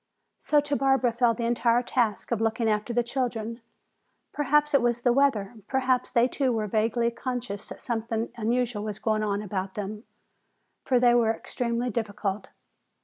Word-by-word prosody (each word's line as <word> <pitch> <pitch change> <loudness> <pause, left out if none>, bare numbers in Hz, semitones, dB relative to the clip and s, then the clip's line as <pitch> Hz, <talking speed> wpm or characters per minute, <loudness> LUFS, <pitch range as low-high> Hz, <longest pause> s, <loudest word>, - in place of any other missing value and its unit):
So 300 - +3
to 290 0 -2
Barbara 270 -3 +2
fell 235 -1 +2
the 235 - -3
entire 240 0 +2
task 240 -3 -1
of 230 -2 0
looking 225 +1 +1
after 215 +2 0
the 240 0 +1
children. 235 -2 -3 0.7
Perhaps 295 +1 +2
it 280 - +5
was 240 0 +1
the 245 0 +3
weather, 245 -7 +2
perhaps 255 -1 +1
they 235 +1 +3
too 265 0 0
were 220 -2 -1
vaguely 225 +3 +1
conscious 235 -4 -5
that - - -9
something 225 -1 -2
unusual 235 -1 -1
was 210 -2 -4
going 215 -1 0
on 205 -1 -1
about 190 -1 -4
them, 210 +2 -5 0.8
for 255 -2 +3
they 240 -1 +5
were 235 -2 +3
extremely 235 +1 -2
difficult. 205 -2 -3
235 Hz, 165 wpm, -27 LUFS, 215-250 Hz, 0.8 s, it